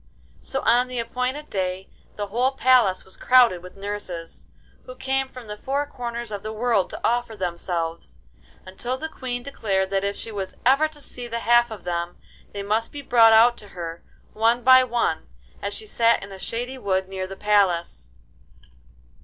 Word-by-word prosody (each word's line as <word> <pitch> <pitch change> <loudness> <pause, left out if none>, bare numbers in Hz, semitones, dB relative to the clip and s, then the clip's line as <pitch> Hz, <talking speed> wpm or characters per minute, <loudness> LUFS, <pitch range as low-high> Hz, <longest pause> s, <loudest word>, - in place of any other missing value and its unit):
So 270 - -3
on 245 +1 +3
the 250 0 -6
appointed 250 +5 -3
day 185 -1 -2 0.3
the 205 - -3
whole 245 +6 0
palace 250 -8 +3
was 190 - -11
crowded 245 -8 +5
with 180 0 -12
nurses, 195 -4 -6 0.4
who 255 - -8
came 265 +1 -1
from 255 -2 -11
the 210 -1 -6
four 275 +6 -1
corners 235 -4 -6
of 205 -1 -4
the 215 - -5
world 220 -3 +1
to - - -8
offer 240 -1 -1
themselves, 170 -3 -3 0.5
until 240 +7 -4
the 315 - -4
Queen 250 -5 -5
declared 195 -8 -1
that 195 0 +1
if 200 0 -1
she 225 - -6
was 195 -3 -5
ever 275 +5 +5
to 305 -1 -12
see 245 -2 -4
the 235 0 -4
half 240 +1 +4
of 215 -4 -9
them, 175 0 -3 0.3
they 200 -1 -5
must 215 +3 0
be 290 -1 -8
brought 230 -3 +6
out 230 +2 +6
to 205 - -9
her, 170 -3 -7 0.3
one 230 +2 +2
by 255 0 +8
one, 235 -10 -1 0.3
as 200 - -3
she 215 - -3
sat 230 +1 +2
in 195 - -9
a 190 - -9
shady 245 +6 -4
wood 190 -3 0
near 190 -1 -4
the 195 - -8
palace. 195 - +1
225 Hz, 185 wpm, -24 LUFS, 190-250 Hz, 0.5 s, by